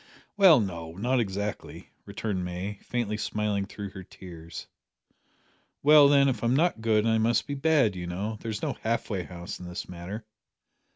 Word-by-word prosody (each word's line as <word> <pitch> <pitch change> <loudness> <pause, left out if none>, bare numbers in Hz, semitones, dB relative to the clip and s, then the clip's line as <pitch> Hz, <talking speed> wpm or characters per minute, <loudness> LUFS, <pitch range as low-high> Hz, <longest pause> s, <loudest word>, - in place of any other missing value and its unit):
"Well, 190 -8 +7
no 85 -6 -4
not 125 +8 0
exactly," 105 -1 -4 0.2
returned 100 -2 -3
May, 90 +3 -5
faintly 115 -3 -2
smiling 105 -1 -1
through 100 -2 -7
her 95 - -9
tears. 85 -4 -10 1.2
"Well, 150 0 +8
then, 140 -1 +5
if 125 -5 -1
I'm 120 +2 +2
not 160 -6 +2
good 110 -1 +2
I 110 -1 +3
must 115 +1 +2
be 145 - -4
bad, 140 -7 +2
you 90 -1 -5
know. 105 +5 -4
There's 110 -2 -4
no - - 0
half 115 +1 -1
way 95 -4 -2
house 85 -1 -8
in 90 - -8
this 90 +1 -6
matter." 90 +5 -7
105 Hz, 170 wpm, -27 LUFS, 95-120 Hz, 1.2 s, Well